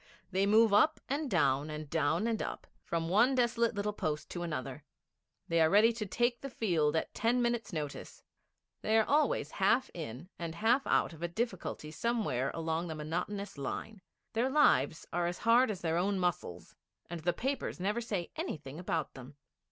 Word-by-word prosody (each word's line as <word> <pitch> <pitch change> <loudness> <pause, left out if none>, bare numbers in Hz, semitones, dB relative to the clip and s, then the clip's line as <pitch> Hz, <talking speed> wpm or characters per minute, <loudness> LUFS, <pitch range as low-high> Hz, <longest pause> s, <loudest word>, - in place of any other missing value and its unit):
They 195 +1 +2
move 220 0 +5
up 305 +10 +4
and 285 +1 -2
down, 145 - +2
and 155 0 -6
down 160 +5 +1
and 230 -1 0
up, - - -5 0.2
from 165 -1 -2
one 225 +9 +4
desolate 235 -2 +2
little 205 +1 -1
post 150 -6 -3
to 175 - -4
another; 145 -4 -4 0.6
they 165 -2 +2
are 160 - +5
ready 215 +5 +5
to 215 -2 -4
take 240 +4 0
the 275 - -5
field 165 - +1
at 160 - -1
ten 235 +3 +1
minutes' 235 -2 0
notice; 150 -4 -6 0.6
they 220 +1 +2
are 220 - +4
always 305 - +1
half 260 - +2
in 155 -1 -7
and 165 -1 -4
half 235 +8 +2
out - - +2
of 160 - -13
a 170 - 0
difficulty 185 -6 -4
somewhere 210 - -1
along 165 +1 -2
the 160 - -4
monotonous 175 +4 -4
line; 195 +9 -5 0.3
their 235 +4 +1
lives 280 - +3
are 175 0 +1
as 175 - -3
hard 235 +2 +4
as 200 -4 -4
their 165 -1 0
own 195 +3 +1
muscles, 175 - -3 0.3
and 175 0 -5
the 175 +3 +1
papers 265 +4 -3
never 205 +6 0
say 200 -7 -3
anything 145 0 -5
about 170 -2 -2
them. 130 +1 -11
180 Hz, 185 wpm, -32 LUFS, 160-230 Hz, 0.6 s, move